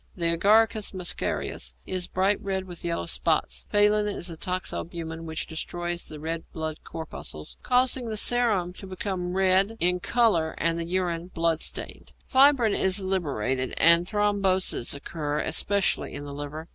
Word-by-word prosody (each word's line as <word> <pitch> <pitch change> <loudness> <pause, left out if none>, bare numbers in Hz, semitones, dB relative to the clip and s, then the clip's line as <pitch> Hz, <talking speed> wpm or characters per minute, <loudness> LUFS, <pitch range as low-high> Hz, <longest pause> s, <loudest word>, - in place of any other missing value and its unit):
The 170 -2 +2
Agaricus 215 +3 +3
muscarius 160 - -3
is 185 -1 -2
bright 195 +2 +1
red 190 -1 -2
with 175 -2 -8
yellow 170 - -2
spots. - - 0
Phallin 210 0 +4
is 185 -4 -3
a - - -7
toxalbumin 165 -2 -4
which 160 0 -3
destroys 175 +1 -4
the 155 - -9
red 165 +2 -3
blood 160 -1 -4
corpuscles, 155 - -7
causing 255 0 +2
the 220 -2 -4
serum 210 -7 +2
to 195 - -8
become 185 -1 -4
red 190 +3 +3
in 180 +1 +2
colour 180 -8 +2
and 165 0 0
the 165 - -3
urine 175 -1 -2
blood 165 -2 0
stained. - - -4
Fibrin 265 -5 +4
is 190 +1 +3
liberated, 135 - -1
and 170 +2 +6
thromboses 200 - +1
occur, 145 0 -4
especially 200 +3 0
in 145 0 -6
the 140 - -7
liver. 145 +3 -6
180 Hz, 150 wpm, -26 LUFS, 165-200 Hz, -, and